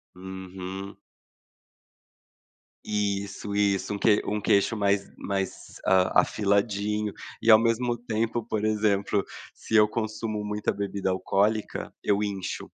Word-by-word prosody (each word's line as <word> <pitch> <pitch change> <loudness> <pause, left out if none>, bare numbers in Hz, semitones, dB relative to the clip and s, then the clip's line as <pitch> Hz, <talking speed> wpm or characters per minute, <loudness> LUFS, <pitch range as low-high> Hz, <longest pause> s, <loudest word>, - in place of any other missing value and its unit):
Uhum. 95 +1 -7 1.9
Isso, 100 -1 -2
isso, 100 -1 +1
um - - -2
que 105 0 +4
um 105 0 -1
queixo 100 +3 +3
mais 100 -1 +1
mais, 95 -1 -4
ah, 95 -1 +4
afiladinho 105 0 0 0.3
e 115 - +4
ao 110 - +9
mesmo 120 +1 +1
tempo, 115 0 -2
por 110 -2 -2
exemplo, 105 -2 +1 0.3
se 110 - -4
eu 105 -1 +7
consumo 110 -1 -3
muita 105 0 -1
bebida 100 -1 -2
alcoólica, 100 +3 0
eu 105 0 +2
incho. 95 -3 -4
105 Hz, 115 wpm, -27 LUFS, 100-110 Hz, 1.9 s, ao